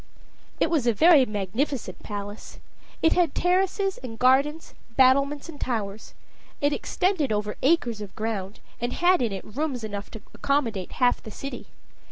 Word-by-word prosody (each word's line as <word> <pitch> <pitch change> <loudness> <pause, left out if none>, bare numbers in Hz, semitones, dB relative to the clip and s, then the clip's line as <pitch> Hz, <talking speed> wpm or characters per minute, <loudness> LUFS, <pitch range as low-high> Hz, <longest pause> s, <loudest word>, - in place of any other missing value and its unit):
It 325 - +2
was 290 -8 +1
a 235 - +4
very 300 - +6
magnificent 215 +7 -3
palace. 205 0 -7 0.5
It 325 - +5
had 345 -5 +2
terraces 380 +2 +1
and 235 -3 -8
gardens, 275 +6 +2 0.2
battlements 275 +3 +3
and 310 -4 -10
towers. 215 -4 -3 0.4
It 290 0 +2
extended 350 - 0
over 210 0 -1
acres 250 -7 +2
of 205 -2 -8
ground, 215 -2 -4 0.2
and 240 +1 -2
had 360 -1 +3
in 235 -3 0
it 195 -1 -6
rooms 260 +1 -3
enough 205 -2 -5
to 220 - -9
accommodate 230 -10 -1
half 245 -1 +2
the 220 - -9
city. 275 +6 -7
255 Hz, 155 wpm, -25 LUFS, 215-300 Hz, 0.5 s, very